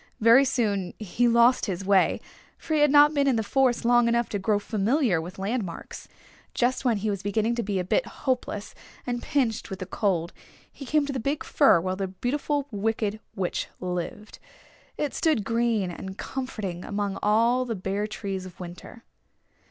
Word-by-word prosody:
Very 230 +5 +6
soon 205 -8 -1
he 225 +4 0
lost 235 +2 +4
his 190 -1 -3
way, 195 -1 +3 0.4
for 315 - -4
he 310 - +3
had 295 0 +5
not 295 +1 +6
been 280 -1 +2
in 265 - +3
the 225 - 0
forest 255 +1 +1
long 240 0 +4
enough 235 0 +1
to 205 - -2
grow 205 +2 +1
familiar 215 - +1
with 175 +3 -9
landmarks. 195 -2 -4 0.5
Just 250 +2 +1
when 240 -4 +2
he 210 +2 -2
was 200 -2 -3
beginning 215 +3 0
to 235 - -1
be 200 -2 -2
a 185 - 0
bit 345 - 0
hopeless 245 -6 -3 0.3
and 245 -1 -2
pinched 250 -9 -1
with 190 - -5
the 185 - -6
cold 180 -4 -1 0.4
he 275 - -10
came 300 +1 +2
to 280 - -4
the 265 - -2
big 280 +6 -2
fir 280 - +4
where 185 +2 -2
the 195 0 -2
Beautiful 275 +8 -2
Wicked 215 0 -1 0.2
Witch 185 -3 -2
lived. 180 +3 -5 0.6
It 295 -2 -2
stood 310 -10 +1
green 230 -5 0
and 190 +2 -8
comforting 215 -9 -5
among 200 -1 -3
all 230 +4 +3
the 235 -3 -3
bare 195 +2 -2
trees 195 -3 -5
of 180 - -15
winter. 180 +6 -10
220 Hz, 185 wpm, -26 LUFS, 195-250 Hz, 0.6 s, Very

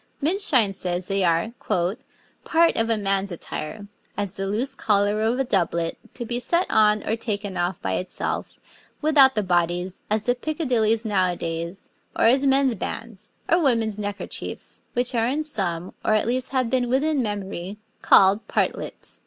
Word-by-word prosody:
Minshein 290 - +3
says 180 -1 -1
they 195 -1 0
are 170 +5 +1 0.9
'part 335 +1 +3
of 225 0 +1
a 225 - +2
man's 195 -1 0
attire, 175 +4 -6 0.3
as 200 -2 -2
the 195 -1 -3
loose 225 +7 -1
collar 205 0 +1
of 225 +3 +1
a 270 - +1
doublet, 170 -7 0 0.2
to 240 - -5
be 240 +1 -1
set 340 +9 +1
on 210 -1 +3
or 220 - +1
taken 205 -4 -4
off 175 0 -1
by 95 - -1
itself, 185 - -3 0.4
without 285 -4 +5
the 210 - +1
bodies, 175 0 0
as 215 0 +1
the 245 - +2
picadillies 245 -6 0
now 190 -4 +2
a - - -4
daies, 170 +3 -5 0.2
or - - +1
as 265 +4 +4
mens' 270 -1 +3
bands, 225 0 -5
or 340 - +4
womens' 230 - +1
neckerchiefs, 205 0 -5
which 245 +1 0
are 230 -1 +1
in 290 +5 -1
some, 185 - -3
or 215 - +2
at 215 - +1
least 250 +2 -1
have 255 -3 0
been 250 -2 +1
within 280 +3 +1
memorie, 200 -3 -4 0.2
called 195 +3 +5
partlets.' - - -2
215 Hz, 170 wpm, -24 LUFS, 190-250 Hz, 0.9 s, without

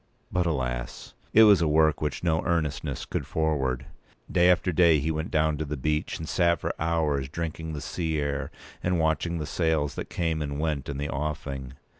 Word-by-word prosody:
But, 90 -1 +1
alas! 60 -5 -3 0.2
it 110 - +7
was 100 -5 +7
a 85 - +3
work 80 0 +3
which 75 +1 -2
no 80 -1 +2
earnestness 80 -5 -1
could - - -3
forward. 65 -5 0 0.5
Day 90 0 +5
after 90 +1 +3
day 85 -1 +5
he 80 +4 -1
went 80 +1 -3
down 80 -1 +1
to - - 0
the 75 0 -4
beach, 75 +3 -1
and 80 - -6
sat 85 0 +2
for - - -2
hours 75 -4 0
drinking 80 0 -4
the 75 - -5
sea 80 +1 -2
air 70 -1 -2 0.3
and 90 -1 +1
watching 80 +2 +1
the 75 - -3
sails 80 -3 0
that - - -6
came 80 -3 -1
and 70 -1 -3
went 75 -4 -1
in 70 - -3
the 70 +1 -3
offing. 70 -2 -4
80 Hz, 195 wpm, -27 LUFS, 70-85 Hz, 0.5 s, it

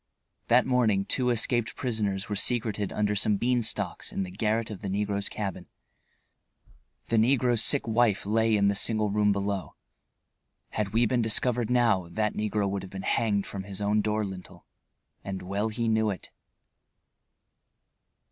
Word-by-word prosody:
That 125 +2 +4
morning 115 -7 +2
two 125 -1 +1
escaped 120 0 0
prisoners 105 -6 -2
were 105 - -3
secreted 110 -2 0
under 105 -1 0
some 105 +1 +2
bean 125 +3 +1
stalks 110 - 0
in 95 - -2
the 90 - -7
garret 110 +3 -1
of 100 - -8
the 100 - -4
negro's 100 0 -1
cabin. 95 -4 -5 1.4
The 115 - +2
negro's 120 0 +3
sick 140 -4 +2
wife 115 -3 +2
lay 110 +1 +2
in 100 0 +3
the 100 - +3
single 105 +1 +1
room 105 0 +3
below. 100 -1 -3 0.9
Had 105 -2 -2
we 115 +3 +3
been 120 +2 +1
discovered 115 +1 0
now 115 -8 +2
that 105 +4 -1
negro 105 -1 -1
would 100 0 -2
have 95 - -9
been 95 0 -7
hanged 105 -4 +1
from 100 - -6
his 100 -2 -6
own 105 +1 +1
door 105 0 -1
lintel. 90 -2 -10 0.6
And 95 -1 -5
well 100 +4 -1
he 115 +1 -2
knew 110 -1 +2
it. 95 - -6
105 Hz, 160 wpm, -27 LUFS, 100-115 Hz, 1.4 s, That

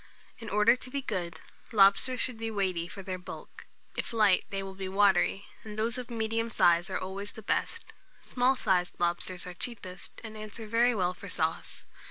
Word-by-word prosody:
In 225 -2 -7
order 210 +4 +5
to 255 - -8
be 280 +1 -3
good, 180 -8 -3 0.3
lobsters 215 +4 +5
should 240 -2 0
be 225 0 -2
weighty 185 -5 -1
for 195 +2 -8
their 185 -1 -4
bulk; 180 - -10 0.3
if - - -3
light, 210 -4 +4
they 195 -1 -3
will 195 0 -6
be 190 0 -5
watery; 200 0 +3 0.2
and 215 -1 -8
those 230 +3 +1
of 250 - -6
the 235 - -7
medium 225 +1 0
size, 175 -3 +4
are 190 - -1
always 195 +2 -5
the 220 - -10
best. - - -2 0.3
Small 255 +1 +3
sized 180 -7 +1
lobsters 175 +1 -1
are 180 - -6
cheapest, 185 -2 -6
and 220 -1 -8
answer 215 +1 -6
very 235 +2 +3
well 180 -3 +1
for 200 +2 -10
sauce. 160 -2 -1
205 Hz, 195 wpm, -30 LUFS, 185-225 Hz, 0.3 s, order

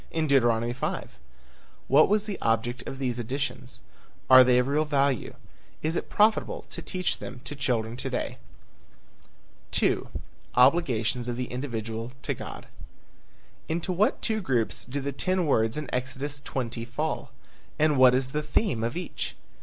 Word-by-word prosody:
In 160 -1 -1
Deuteronomy 120 -4 +3
5? 65 - -4 0.7
What 145 +6 +6
was 210 0 +3
the 205 -3 -5
object 115 +2 0
of 135 - -5
these 125 -3 -2
additions? 130 +1 -4 0.5
Are 130 0 +11
they 125 0 +4
of 125 - +3
real 150 +3 +2
value? 140 -4 0 0.5
Is 160 +2 0
it - - -3
profitable 215 +1 +2
to - - -5
teach 185 -2 -1
them 125 +1 -7
to 145 +2 -5
children 120 -5 -1
to 130 +1 -3
day? 125 - -3 1.4
II. - - +3 0.6
OBLIGATIONS 125 -4 +3
OF 120 - -2
THE 125 0 -4
INDIVIDUAL 115 -2 -4
TO - - -1
GOD. - - -8 1.0
Into 170 +3 -1
what 200 +5 +1
two 220 -1 0
groups 125 - -1
do 140 +3 -4
the 140 +1 -2
ten 185 +5 0
words 115 -3 +2
in 150 -2 -4
Exodus 135 +3 -3
20 120 -4 -4
fall? 145 +3 -3 0.5
And 155 -1 +3
what 130 -1 +7
is 130 0 -1
the 150 - -1
theme 150 - 0
of 120 +7 -2
each? 180 - -4
130 Hz, 155 wpm, -27 LUFS, 120-150 Hz, 1.4 s, Are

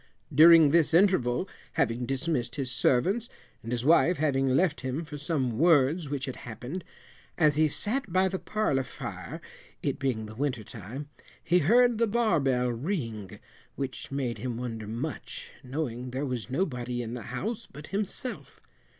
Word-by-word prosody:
During 160 0 +8
this 165 0 +4
interval, 180 -5 +3 0.3
having 120 -1 0
dismissed 135 -3 -1
his 135 -3 -2
servants, 180 - +2 0.3
and 115 - -7
his 125 0 -2
wife 170 +2 +5
having 135 -2 +1
left 150 +4 +2
him 135 +5 -3
for 155 -1 -8
some 135 -6 -1
words 155 -1 +4
which 140 -2 -2
had 130 - -6
happened, 125 - -7 0.5
as 150 -3 +4
he 155 +1 +4
sat 215 - 0
by 185 +2 +3
the 190 0 -3
parlour 215 -11 0
fire, 125 - -7 0.4
it 140 - -1
being 125 -5 -1
the 105 - -9
winter 125 -2 -2
time, 115 +8 -8 0.3
he 175 +2 +3
heard 235 +7 +4
the 230 - +3
bar 220 -6 +2
bell 125 -3 +1
ring, 115 - -4 0.4
which 135 -1 -5
made 130 -4 -2
him 125 -2 -3
wonder 115 -3 -5
much, 120 +8 -5
knowing 125 -2 -4
there 130 +3 -3
was 125 -3 -4
nobody 125 -5 -2
in 115 0 -6
the 125 - -5
house 205 - -3
but 150 +2 -11
himself. 210 +5 -3
135 Hz, 160 wpm, -28 LUFS, 125-170 Hz, 0.5 s, During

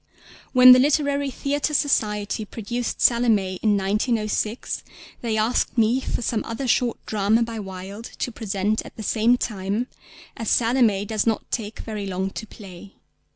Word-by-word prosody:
When 255 -1 +9
the 250 - +9
Literary 285 0 +2
Theatre 285 +3 -1
Society 210 -7 0
produced 230 +3 -4
Salomé 215 -6 +2
in 210 -2 +3
1906 215 +2 -1 0.4
they 225 -2 -1
asked 225 +3 0
me 230 +3 +3
for 245 - -3
some 225 -1 -1
other 230 +4 -4
short 240 -1 +1
drama 215 +2 +2
by 230 -1 -5
Wilde 195 +2 -8
to 245 - -2
present 210 -1 -1
at - - -13
the 220 - -7
same 230 +4 +3
time, 205 +1 -2 0.5
as 225 - -3
Salomé 230 -4 +2
does 215 +1 -1
not 225 - -1
take 220 -2 -4
very 210 -3 -5
long 190 +1 -2
to 220 - -7
play. 195 -1 -12
220 Hz, 155 wpm, -23 LUFS, 205-245 Hz, 0.5 s, When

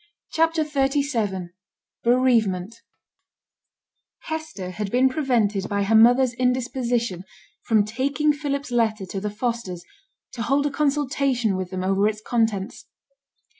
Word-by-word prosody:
CHAPTER 325 0 +2
XXXVII 270 - -1 0.5
BEREAVEMENT 230 -6 +2 1.5
Hester 315 -13 -5
had 205 +1 -4
been 255 +4 +3
prevented 235 -9 0
by 200 0 0
her 205 +3 0
mother's 245 +3 +5
indisposition 245 -5 -1 0.4
from 215 -3 +3
taking 280 +7 0
Philip's 280 -2 -3
letter 220 -4 +1
to 195 +2 -5
the 210 - -2
Fosters, 210 -5 -4 0.5
to 235 - -6
hold 275 +5 +1
a 290 - 0
consultation 275 -6 0
with 185 -1 -4
them 185 0 -4
over 195 +2 +2
its 215 0 -2
contents. 220 -2 -2
235 Hz, 120 wpm, -23 LUFS, 205-275 Hz, 1.5 s, mother's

